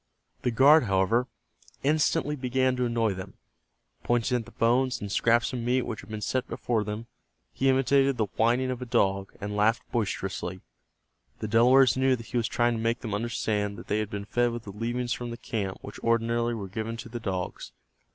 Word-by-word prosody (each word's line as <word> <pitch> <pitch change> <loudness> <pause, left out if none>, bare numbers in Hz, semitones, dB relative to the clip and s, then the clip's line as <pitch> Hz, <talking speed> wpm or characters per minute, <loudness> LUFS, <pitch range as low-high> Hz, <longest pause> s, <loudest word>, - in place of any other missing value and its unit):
The - - +1
guard, 135 +5 +6
however, 100 +5 +2 0.6
instantly 150 +1 +2
began 130 -1 +1
to 125 0 0
annoy 115 -3 +1
them. 95 0 -8 0.7
Pointing 120 +1 +1
at 115 - -5
the - - -14
bones 125 +3 +1
and 100 -1 -6
scraps 120 +4 +2
of 125 - -2
meat 125 +2 +1
which 110 - -5
had 95 - -15
been 110 -1 -5
set 130 +4 -1
before 115 -3 -1
them, 105 +2 -5 0.5
he 135 - +1
imitated 135 0 +3
the 110 - +2
whining 120 +3 +2
of 125 -1 -5
a - - -3
dog, 95 -3 +1
and 105 +1 -4
laughed 110 +3 +2
boisterously. 95 -4 -2 0.8
The 110 - -4
Delawares 125 +5 +5
knew 130 0 +3
that 115 -2 -9
he 125 - -3
was 115 -1 +1
trying 120 0 +1
to 115 - -3
make 115 +1 0
them 110 -4 -4
understand 105 -2 -1
that - - -11
they 105 - +1
had 105 -1 -2
been 100 -1 -5
fed 120 +3 +1
with 120 -1 -5
the 100 - -8
leavings 120 +4 -2
from 120 -1 -5
the 115 - -6
camp 100 -6 -3
which - - -9
ordinarily 115 0 +1
were 100 -3 -5
given 110 +4 -4
to 115 - -8
the 120 +1 -6
dogs. 95 - -4
115 Hz, 200 wpm, -27 LUFS, 105-125 Hz, 0.8 s, guard